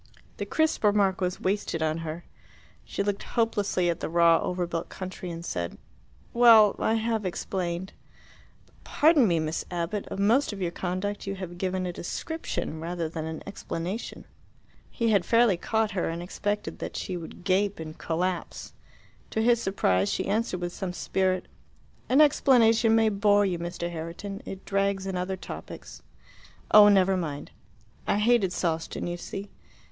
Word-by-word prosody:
The - - -4
crisp 315 -5 +1
remark 200 -2 +3
was 180 0 -1
wasted 190 -4 -1
on 155 +1 0
her. 165 +1 -6 0.6
She - - -3
looked 200 0 -2
hopelessly 205 -6 0
at 170 - 0
the - - -3
raw 170 0 +5
over 180 -1 -2
built 170 -1 -4
country, 185 -1 -7
and 170 0 -6
said, 85 - -4 0.6
"Well, 230 -3 +7
I 220 - +2
have 225 -1 -1
explained." 185 0 -3 0.7
"But - - -29
pardon 300 -5 +4
me, 170 -3 +2
Miss 155 +1 -2
Abbott; 175 +4 -3
of - - -6
most 225 +8 +3
of 205 - -7
your 175 -3 -1
conduct 190 +4 -3
you 195 - -2
have 175 -2 -7
given 185 0 -1
a 175 - -3
description 180 - -4
rather 170 0 -3
than 160 0 -5
an 160 0 -6
explanation." 195 +1 -5 0.6
He 230 -1 0
had 200 -4 +3
fairly 230 +1 +4
caught 220 +4 0
her, 185 -3 -1
and 170 +1 -4
expected 205 +3 -3
that - - -5
she 185 - -4
would 170 +1 -8
gape 195 +1 +1
and 155 -1 -7
collapse. 175 +1 -3 0.6
To - - -2
his 235 +1 +3
surprise 100 - +1
she - - -1
answered 205 -3 -1
with 175 0 -3
some 185 -2 -4
spirit, 185 0 -1 0.6
"An 270 +4 +6
explanation 235 -6 +5
may 225 -1 +4
bore 205 0 +3
you, 180 -3 -1
Mr. 170 0 -4
Herriton: 170 +5 -6
it 190 0 -7
drags 195 -1 0
in 190 -1 -3
other 185 +1 -2
topics." - - -9 0.7
"Oh, 210 -1 +9
never 195 -1 +4
mind." 150 -6 -4 0.6
"I - - +2
hated 210 -3 +3
Sawston, 165 -3 -2
you 175 0 -3
see." 195 +3 -7
190 Hz, 165 wpm, -27 LUFS, 170-210 Hz, 0.7 s, Oh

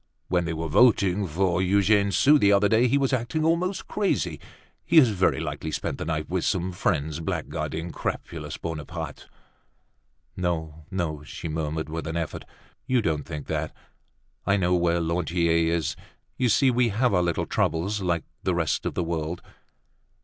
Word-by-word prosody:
When 90 -1 +1
they 85 - -2
were 80 +1 -3
voting 100 +1 +4
for 90 +2 +1
Eugene 100 +2 +3
Sue 145 +8 +5
the 100 -4 +4
other 100 +1 +4
day, 115 +3 +4
he 140 - +3
was 135 -1 +1
acting 130 +6 0
almost 175 +4 0
crazy. 90 - -1 0.4
He 170 - +2
has 135 -7 +8
very 95 -3 +1
likely 80 - -4
spent - - -3
the - - -3
night 75 -1 -2
with 90 -1 -1
some 95 -2 0
friends 80 -4 -1
blackguarding 85 +1 -3
crapulous - - -5
Bonaparte." 80 -4 -6 1.1
"No, 80 -4 -3
no," 85 -6 -2
she 75 - -7
murmured 80 0 -3
with 80 0 -5
an 80 +1 -2
effort. 85 -2 -4 0.4
"You 125 -3 +2
don't 75 -6 -1
think 75 -3 -6
that. - - -3 0.7
I 100 +1 +2
know 90 -2 +1
where 85 -1 +2
Lantier 85 0 +1
is. 85 -2 -1 0.4
You 125 -2 +1
see, 125 +5 +4
we 120 -1 +2
have 115 +2 +1
our 90 - +3
little 85 -1 0
troubles 95 +6 0
like 85 -3 0 0.2
the 95 - 0
rest 80 -3 0
of - - -4
the 90 - 0
world!" 85 0 -3
90 Hz, 170 wpm, -26 LUFS, 80-105 Hz, 1.1 s, has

